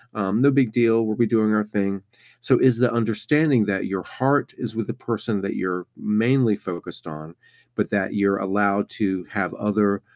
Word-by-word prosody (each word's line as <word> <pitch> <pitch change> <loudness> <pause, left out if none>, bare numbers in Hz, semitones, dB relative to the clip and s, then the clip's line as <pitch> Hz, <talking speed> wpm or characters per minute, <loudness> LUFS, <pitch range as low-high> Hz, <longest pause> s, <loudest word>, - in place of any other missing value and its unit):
um, 105 +2 0
no 140 - +6
big 130 -5 +2
deal, 115 -1 +3
we'll 110 -1 -2
be 120 - +2
doing 110 -1 +2
our 105 - +2
thing." 100 -2 -2 0.4
So, 130 +1 +3
is 130 -2 +4
the 125 0 +2
understanding 115 +3 +2
that 95 -2 -1
your 95 -1 -3
heart 135 +2 0
is 115 -2 -6
with 115 -1 -3
the - - -3
person 110 -3 -3
that 100 - -4
you're 90 -1 -3
mainly 115 +2 +2
focused 90 -3 -8
on, 80 +1 -10 0.4
but - - -1
that - - -1
you're 100 -1 +2
allowed 100 +1 0
to 95 -4 -1
have 100 -3 -2
other 105 -1 0
105 Hz, 190 wpm, -22 LUFS, 100-115 Hz, 0.4 s, no